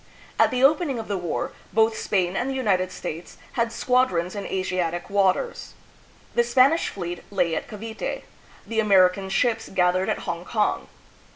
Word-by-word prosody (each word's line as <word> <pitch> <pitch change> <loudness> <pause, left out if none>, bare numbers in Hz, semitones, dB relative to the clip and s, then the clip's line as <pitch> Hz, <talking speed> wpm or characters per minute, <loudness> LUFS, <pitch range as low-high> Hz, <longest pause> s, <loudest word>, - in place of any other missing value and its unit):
At - - +6
the 255 0 -1
opening 290 -1 +3
of 225 - -5
the 200 - -1
war, 175 -3 -3 0.2
both 220 0 +3
Spain 185 -4 0
and 245 +6 -1
the 270 - -2
United 185 -8 +1
States 165 -1 -7
had 235 -1 0
squadrons 235 -8 +1
in 205 -1 -5
Asiatic 185 -1 -2
waters. 200 - 0 0.6
The 240 - +3
Spanish 260 +7 +3
fleet 175 -2 -5
lay 180 -5 0
at - - -4
Cavite, 220 +1 -5 0.4
the 225 -1 -2
American 190 -2 +4
ships 225 +3 0
gathered 185 0 +1
at - - -2
Hong 170 0 -3
kong. 210 +3 -1
200 Hz, 160 wpm, -24 LUFS, 180-235 Hz, 0.6 s, At